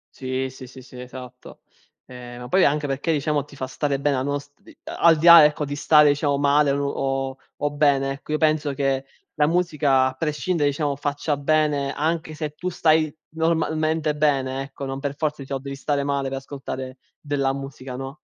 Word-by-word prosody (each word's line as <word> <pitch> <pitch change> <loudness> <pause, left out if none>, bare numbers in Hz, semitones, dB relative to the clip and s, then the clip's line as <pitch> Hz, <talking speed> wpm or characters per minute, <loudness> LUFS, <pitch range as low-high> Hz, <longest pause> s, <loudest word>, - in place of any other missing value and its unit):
Sì, 130 0 -3
sì, 130 0 -11
sì, 130 +1 -12
sì, 125 0 -13
esatto. 125 0 -11 0.5
Eh, 125 -1 -10
ma 125 - -8
poi 190 +5 +3
anche 145 0 +1
perché, 140 +5 -1
diciamo, 150 -1 0
ti 145 - -15
fa 130 -1 -4
stare 140 +1 -2
bene, 140 -1 +1
a 130 - -1
nos 145 0 -3 0.3
al 165 -2 +3
di 160 - -2
là, 170 -2 +11
ecco, 150 0 +1
di 145 +1 -4
stare, 150 0 +5
diciamo, 145 -1 0
male 145 0 +3
o 135 -1 -2 0.2
o 145 0 0
bene, 140 -2 +2
ecco, 140 +2 -10
io 155 - +1
penso 155 -2 +1
che 135 -1 -1 0.3
la 150 - +3
musica, 150 -6 +2
a 130 - -4
prescindere, 150 +1 0
diciamo, 145 0 -1
faccia 145 +1 -2
bene, 145 -1 +1
anche 160 0 -2
se 150 -1 -4
tu 180 +4 -3
stai, 155 -3 +2 0.2
normalmente, 160 -1 0
bene, 135 -3 0
ecco. 140 0 -8
Non 135 0 -4
per 140 0 -4
forza, 150 -1 -2
diciamo, 135 0 -4
devi 140 0 -7
stare 140 +1 -1
male 140 -1 -1
per 135 - -4
ascoltare 135 -1 -7 0.2
della 140 -2 0
musica, 135 -2 -7
no. 135 +5 -7
145 Hz, 190 wpm, -23 LUFS, 135-150 Hz, 0.5 s, là